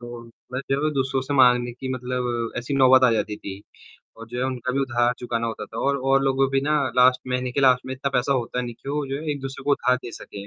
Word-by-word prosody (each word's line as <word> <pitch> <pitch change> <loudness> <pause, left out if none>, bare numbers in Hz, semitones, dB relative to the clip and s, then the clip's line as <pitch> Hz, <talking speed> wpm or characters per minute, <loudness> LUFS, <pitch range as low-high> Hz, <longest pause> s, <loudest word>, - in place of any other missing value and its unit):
तो 120 0 -9 0.3
मैं 130 - -2
जब 140 +3 +1
दूसरों 135 0 0
से 145 +2 -3
माँगने 125 -2 +4
की 130 +2 -7
मतलब 125 -2 -3
ऐसी 120 +4 -3
नौबत 130 -1 +6
आ 125 - +5
जाती 105 -1 -1
थी, 100 -1 -8 0.6
और 115 0 -10
जो 120 +1 -6
है 125 - 0
उनका 130 -1 -3
भी 140 - 0
उधार 120 -2 +1
चुकाना 115 -1 -2
होता 115 -2 -5
था 115 - -9
और, 140 +3 +1
और 135 0 +2
लोगों 135 0 +2
भी 135 - +2
ना 150 +2 +1 0.2
लास्ट 125 0 +5
महीने 125 0 -1
के 140 - 0
लास्ट 130 -2 +4
में 130 - -4
इतना 140 +1 -3
पैसा 135 +1 +1
होता 125 -1 -2
है 125 - -1
नहीं 120 -1 -6
कि 135 - -12
वो 145 +1 -1
जो 135 0 -3
है 155 - -3
एक-दूसरे 135 -1 -7
को 145 - 0
उधार 125 -2 +2
दे 120 - -6
सकें। 100 0 -9
125 Hz, 265 wpm, -23 LUFS, 120-135 Hz, 0.6 s, नौबत